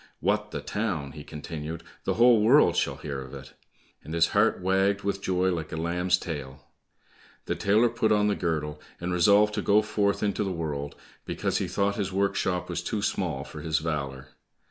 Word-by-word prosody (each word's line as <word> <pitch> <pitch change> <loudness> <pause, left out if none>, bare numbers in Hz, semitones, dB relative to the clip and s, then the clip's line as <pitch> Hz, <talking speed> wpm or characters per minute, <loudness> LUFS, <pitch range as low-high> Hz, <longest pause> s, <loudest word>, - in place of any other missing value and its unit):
"What, - - 0
the - - -5
town!" 95 -11 -3
he 75 0 -9
continued, 80 +2 -6 0.2
"The - - 0
whole 120 -2 +6
world 130 +8 +5
shall - - 0
hear 70 -2 -5
of 65 -1 -9
it!" - - -11 0.5
and 80 +3 -6
his 85 0 +4
heart 105 +2 +3
wagged 95 +2 +1
with 100 -1 -2
joy 95 -1 +1
like 85 -3 -3
a 80 - -4
lamb's 90 +2 +1
tail. 70 -5 -7 0.8
The - - -1
tailor 110 +4 +3
put 115 -2 0
on 105 -1 +4
the 105 - +2
girdle, 75 -3 -2 0.2
and 90 +1 -2
resolved 100 +4 +5
to 105 - -1
go 105 +2 +4
forth 105 -1 0
into 105 0 0
the 95 - -2
world, 75 -4 -4 0.3
because - - -1
he - - -1
thought 100 0 0
his 100 -2 -2
workshop 95 -2 0
was 85 -1 -3
too 100 +4 -3
small - - -1
for - - -9
his 80 -1 0
valour. 70 -4 -3
90 Hz, 190 wpm, -27 LUFS, 80-100 Hz, 0.8 s, whole